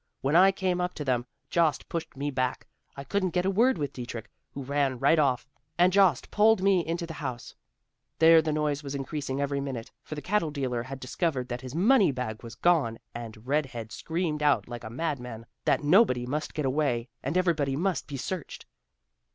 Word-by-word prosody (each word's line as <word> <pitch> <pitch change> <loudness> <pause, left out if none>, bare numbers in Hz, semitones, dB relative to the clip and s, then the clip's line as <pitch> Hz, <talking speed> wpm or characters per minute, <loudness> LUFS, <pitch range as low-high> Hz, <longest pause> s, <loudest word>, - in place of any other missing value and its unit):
When 140 +4 +1
I 190 +3 +7
came 185 -2 -1
up 180 0 -2
to 150 - -5
them, 125 -1 0 0.2
Jost 165 -3 +2
pushed 165 -4 -5
me 145 +1 -2
back; 130 -1 -1 0.3
I 140 - -5
couldn't 185 +5 -1
get 180 0 +2
a 195 - +2
word 235 +4 +3
with 145 -3 -3
Dietrich, 120 -2 -7 0.2
who 140 - -5
ran 140 -1 0
right 140 +6 +4
off, 135 -3 +1 0.3
and 180 +1 +4
Jost 190 -9 +3
pulled 215 -2 +4
me 195 -3 +4
into 170 +1 -3
the 165 - -7
house. 125 -4 -5 0.6
There 165 0 +7
the 155 0 -1
noise 150 -1 0
was 140 -1 -5
increasing 140 0 -3
every 140 0 -1
minute, 130 -5 -5
for 155 - -7
the 150 - -5
cattle 205 -5 +1
dealer 130 -5 -2
had 135 +3 -7
discovered 130 -1 -2
that 120 0 -4
his 130 +2 -8
money 205 - +5
bag 125 -4 -4
was 115 -1 -9
gone, 140 -6 +2 0.2
and 115 -1 -8
red 145 +2 +1
head 115 -3 -7
screamed 160 -2 -2
out 145 -9 +3
like 120 -1 -7
a 110 - -6
mad 150 +3 -2
man, 115 -2 -8 0.2
that - - +2
nobody 150 - +4
must 150 +4 -3
get 150 - -1
away, 130 -4 0
and 140 +7 -1
everybody 155 -7 +1
must 180 +4 -1
be 140 - -5
searched. 170 +4 -5
145 Hz, 205 wpm, -28 LUFS, 130-170 Hz, 0.6 s, I